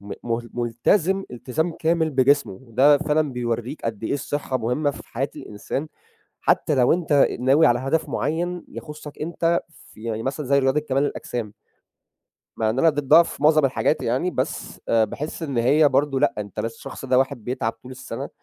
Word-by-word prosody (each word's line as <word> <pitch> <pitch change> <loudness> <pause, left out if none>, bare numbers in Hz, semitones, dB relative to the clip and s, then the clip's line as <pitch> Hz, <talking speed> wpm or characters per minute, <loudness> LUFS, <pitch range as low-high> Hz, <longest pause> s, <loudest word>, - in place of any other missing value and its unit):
م 100 0 -8
م 115 -1 0 0.2
ملتزِم 160 - +1
إلتزام 145 +7 -2
كامل 160 0 +1
بجسمه، 135 -5 +2
ده 140 +5 +5
فعلًا 150 -2 0
بيورّيك 120 +3 -3
قد 115 -1 -3
إيه - - -1
الصحّة 140 -1 -2
مهمّة 125 +6 0
في - - -10
حياة 135 +4 -2
الإنسان 135 +8 -5 0.5
حتى 150 - +2
لو 125 +1 +4
أنت 160 -5 +3
ناوي 140 +5 +5
على 120 0 +3
هدف 145 +5 -1
معيّن 175 +4 -2
يخُصّك 150 -1 -9
أنت، 170 +1 0
في 135 -7 -17
يعني 115 -1 -3
مثلًا 140 +2 -3
زي 140 +1 +3
رياضة 135 +2 +2
كمال 135 -2 0
الأجسام. 115 -6 -4 1.0
مع 110 -1 +1
إن 120 - -2
أنا 165 - +5
ضدّها 145 +3 +5
في 155 - -8
مُعظَم 155 -1 +5
الحاجات 135 +3 +1
يعني، 130 +10 0
بس - - -4
آآ 115 -1 +4
باحس 150 +9 -6
إن 140 -6 -2
هي 145 +6 +4
برضه، 135 0 +1
لأ 145 - +2
أنت 105 0 -5
ل - - -3
الشخص 115 +3 -7
ده 130 -1 +3
واحد 125 -4 -1
بيتعَب 120 -2 -2
طُول 125 +3 -13
السّنَة، 130 - -6
135 Hz, 180 wpm, -23 LUFS, 120-155 Hz, 1.0 s, ده